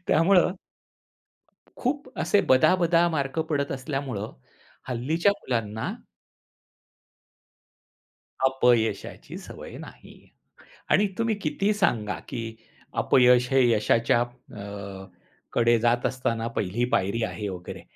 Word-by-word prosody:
त्यामुळं, 180 +2 +4 1.2
खूप 270 +2 -2
असे 205 - +3
बदाबदा 170 +5 +4
मार्क 140 -2 -2
पडत 140 -2 -1
असल्यामुळं 130 -5 -4 0.6
हल्लीच्या 155 +10 +1
मुलांना 110 -3 -2 2.6
अपयशाची 125 -4 +1
सवय - - -10
नाही. - - -13 0.7
आणि 205 +1 +4
तुम्ही 230 -2 +1
कितीही 195 +7 0
सांगा, 115 - 0
की 115 -3 -5 0.5
अपयश 125 -1 +5
हे 135 0 +5
यशाच्या 115 +2 +2
अ, 100 -5 -8 0.5
...कडे 120 0 +4
जात 120 +1 +1
असताना 115 -3 -1
पहिली 105 +6 0
पायरी 100 +5 +1
आहे 105 -2 -3
वगैरे, 90 -1 -7
125 Hz, 95 wpm, -26 LUFS, 115-155 Hz, 2.6 s, अपयश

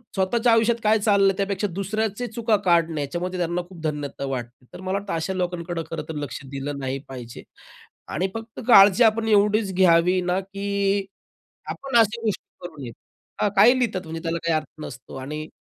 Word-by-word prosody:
स्वतःच्या 225 +5 +2
आयुष्यात 225 +1 +3
काय 215 +1 +4
चाललंय 200 -2 +4
त्यापेक्षा 200 0 -1
दुसऱ्याचे 215 +4 -2
चुका 225 0 0
काढणे 165 -3 +2
याच्यामध्ये 175 +6 -3
त्यांना 175 +1 -1
खूप 185 -3 -12
धन्यता 145 -3 -3
वाटते. 125 -2 -6
तर - - -9
मला 185 +1 -1
वाटतं 200 0 -5
अशा 165 +3 -2
लोकांकडे 175 -2 -3
खरं 165 - -3
तर 160 - -5
लक्ष 145 -2 -5
दिलं 140 +1 -4
नाही 135 0 -3
पाहिजे 125 -3 -9 0.7
आणि 180 +5 0
फक्त 225 0 -8
काळजी 200 0 +8
आपण 225 0 +3
एवढीच 210 -1 +3
घ्यावी 180 0 +4
ना, 180 +1 0
की 200 0 -1 0.7
आपण 270 -3 -3
अशा 225 +1 +3
गोष्टी 215 -3 -1 0.2
करू 155 -5 -11
नयेत. 120 -3 -7 0.5
हां, 210 - +2
काही 240 +6 +7
लिहितात 220 -7 0
म्हणजे 165 0 -6
त्याला 165 0 -1
काही 165 - +2
अर्थ 155 0 -6
नसतो 125 0 -9
आणि 150 +4 -5
185 Hz, 175 wpm, -24 LUFS, 160-210 Hz, 0.7 s, काळजी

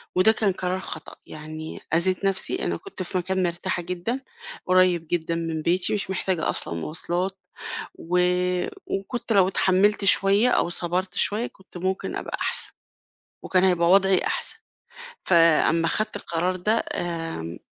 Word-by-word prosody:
وده 185 +4 +6
كان 215 -2 +1
قرار 180 0 -2
خطأ، 160 -4 -7
يعني 155 +1 -8
أذيت 185 +3 +3
نفسي، 195 -1 -1
أنا - - -1
كنت 385 - -7
في 185 - -3
مكان 185 +1 -1
مرتاحة 175 +1 -2
جدًا، 180 +8 -3 0.5
قريب 180 -2 +3
جدًا 165 -1 0
من 165 -1 -3
بيتي، 175 +3 +1
مش 205 -2 -1
محتاجة 185 -3 -1
أصلًا - - -2
مواصلات، 175 - -3 0.6
و 180 +2 -1 0.7
وكنت 230 +4 -3
لو 195 -3 +5
اتحمّلت 195 +2 +2
شوية 200 +4 +5
أو 175 - +2
صبرت 180 +2 -1
شوية 220 +4 +1
كنت 190 -1 -15
ممكن 190 +2 -2
أبقى - - -4
أحسن، - - 0 0.7
وكان 185 -1 +2
هيبقى 175 -2 +3
وضعي 195 -1 +5
أحسن. - - -3 0.7
فأمّا 165 -1 +4
خدت 215 +4 -1
القرار 180 -1 -2
ده 210 +5 +1
آمم 165 - -4
185 Hz, 140 wpm, -24 LUFS, 170-195 Hz, 0.7 s, وده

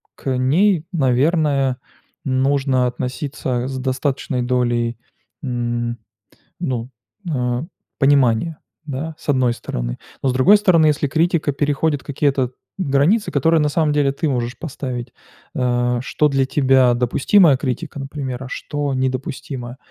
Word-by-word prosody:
к 130 -2 -2
ней, 165 +6 +2
наверное, 140 -1 +2 0.5
нужно 135 -1 +1
относиться 125 0 -3
с 135 - -4
достаточной 130 0 -1
долей, 120 -2 0 0.5
м, 120 -2 -2 0.6
ну, 125 -8 -3 0.4
а, 125 -3 -1 0.4
понимания, 140 +2 +3 0.3
да, 155 +2 -5
с - - -9
одной 130 -4 +3
стороны. - - -4 0.3
Но 135 - +2
с - - +1
другой 155 +12 +6
стороны, 180 -7 +4
если 145 -1 +1
критика 160 0 +1
переходит 145 +1 0
какие-то 135 -3 0 0.3
границы, 160 +7 +2
которые 165 0 +3
на 150 - +2
самом 155 0 +1
деле 145 -2 +2
ты 155 +2 -1
можешь 120 -2 -2
поставить: 130 -5 -5 0.4
а, 120 -1 +1
что 150 +3 +1
для 135 -1 +2
тебя 130 -3 +4
допустимая 135 - +4
критика, 130 +1 -4
например, 135 -2 -5
а 130 - -9
что 145 -1 -3
недопустимо. 130 -1 -3
135 Hz, 125 wpm, -20 LUFS, 125-150 Hz, 0.6 s, другой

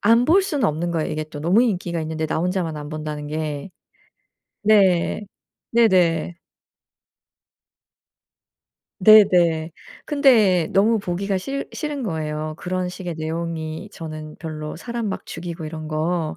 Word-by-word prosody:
안 230 +3 +4
볼 365 +8 +5
수는 295 - -1
없는 170 +1 -1
거예요. 160 -2 -1
이게 155 0 -2
또 155 -1 -10
너무 180 +10 +3
인기가 180 -7 -1
있는데 160 0 -3
나 160 - -1
혼자만 175 -2 -1
안 145 - -7
본다는 150 -1 -5
게. 150 +1 -4 0.9
네. 200 -3 +3 0.5
네네. 180 -8 +3 2.6
네네. 175 -6 +6 0.3
근데 225 - +4
너무 215 +3 +4
보기가 195 +1 -2
싫 275 +9 -4
싫은 300 -3 -4
거예요. 155 -5 -3
그런 185 0 -2
식의 180 -2 -6
내용이 160 +2 -4
저는 155 -1 -8
별로 155 -2 -6
사람 235 +3 -4
막 195 - -5
죽이고 165 0 -6
이런 155 0 -6
거 160 +1 -1
170 Hz, 245 characters per minute, -22 LUFS, 155-205 Hz, 2.6 s, 네네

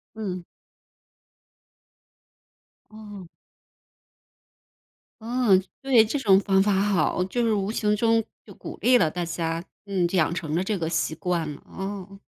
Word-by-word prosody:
嗯。 185 -5 -5 2.5
哦。 205 -3 -10 2.0
嗯， 225 -5 +2 0.2
对， 255 -5 +5
这 250 +6 -2
种 195 -6 +5
方 195 -1 +3
法 200 0 +2
好。 190 -3 +1
就 240 +6 -2
是 225 - +2
无 200 0 -1
形 210 -2 +1
中 225 +1 +2 0.2
就 - - -13
鼓 - - -9
励 250 0 +5
了 160 - +2
大 175 +2 -4
家， 165 0 -3 0.2
嗯， 190 -3 0
养 170 -3 +1
成 160 -3 -4
了 180 - +1
这 205 0 -1
个 160 -2 -2
习 165 -1 -1
惯 170 -4 -2
了， - - -13 0.2
嗯。 195 0 -6
195 Hz, 145 characters per minute, -25 LUFS, 175-215 Hz, 2.5 s, 对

